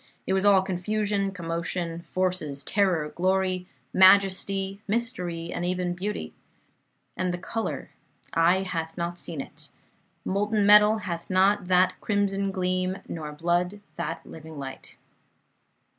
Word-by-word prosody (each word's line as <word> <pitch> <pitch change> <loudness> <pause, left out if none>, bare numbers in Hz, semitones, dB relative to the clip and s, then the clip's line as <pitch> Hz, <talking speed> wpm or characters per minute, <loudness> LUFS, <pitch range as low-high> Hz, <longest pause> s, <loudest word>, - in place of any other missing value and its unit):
It 190 - 0
was 190 +1 +2
all 195 -2 +6
confusion, 200 +2 -1
commotion, 170 -1 -3
forces, 180 -6 -2
terror, 180 -6 +1
glory, 185 +1 0 0.3
majesty, 195 +1 +4
mystery, 180 -7 -2
and 175 - -3
even 180 0 -1
beauty. 200 +4 -4 0.8
And 185 -1 -1
the 175 - -3
color, 225 +5 -4 0.4
'eye 175 +3 +4
hath 165 -3 -4
not 175 0 -3
seen' 160 -5 -4
it! - - -12 0.6
Molten 205 +2 +1
metal 210 +1 +7
hath 170 -2 -5
not 190 0 +3
that 185 0 +3
crimson 200 -1 0
gleam, 185 0 -1
nor 155 -3 -5
blood 175 +5 0 0.2
that 170 -3 -4
living 160 -1 -10
light." 135 -1 -8
185 Hz, 125 wpm, -26 LUFS, 170-195 Hz, 0.8 s, metal